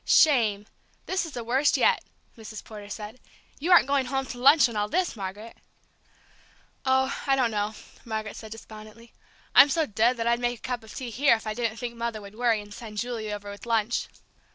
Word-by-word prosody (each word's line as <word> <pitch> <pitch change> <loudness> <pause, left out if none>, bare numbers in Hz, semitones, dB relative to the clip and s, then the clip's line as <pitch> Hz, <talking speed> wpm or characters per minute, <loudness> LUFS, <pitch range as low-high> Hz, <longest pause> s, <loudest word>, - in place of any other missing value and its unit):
"Shame 220 -9 +4 0.4
this 375 -2 -1
is 310 - -10
the 240 - -5
worst 265 +5 +2
yet!" - - +3 0.3
Mrs. 220 -1 -9
Porter 210 -2 -10
said. 210 +3 -7 0.4
"You 335 +6 -1
aren't 355 - +8
going 275 -2 +1
home 270 +1 -1
to 245 - -8
lunch 280 +2 +7
in 235 - -8
all 210 0 -1
this, 360 0 0
Margaret?" 205 +3 -7 1.3
"Oh, 265 +1 +2
I 270 - +4
don't 250 -4 +1
know," 210 0 -2 0.3
Margaret 220 -2 -4
said 220 -1 -10
despondently. 220 +1 -12 0.4
"I'm 285 - +9
so 320 +2 +1
dead 230 +2 +2
that 230 - -2
I'd 235 0 +2
make 245 0 -1
a - - -24
cup 250 -2 -3
of 220 - -12
tea 250 -3 -5
here 275 +2 +4
if 220 - -8
I 215 - -2
didn't 230 -1 -2
think 235 +1 -5
Mother 235 -2 -3
would 200 -1 -11
worry 230 -1 +1
and 205 0 -12
send 215 -1 -9
Julie 225 -2 -3
over 205 -1 -6
with 205 +3 -11
lunch." 230 0 0
230 Hz, 205 wpm, -26 LUFS, 215-255 Hz, 1.3 s, I'm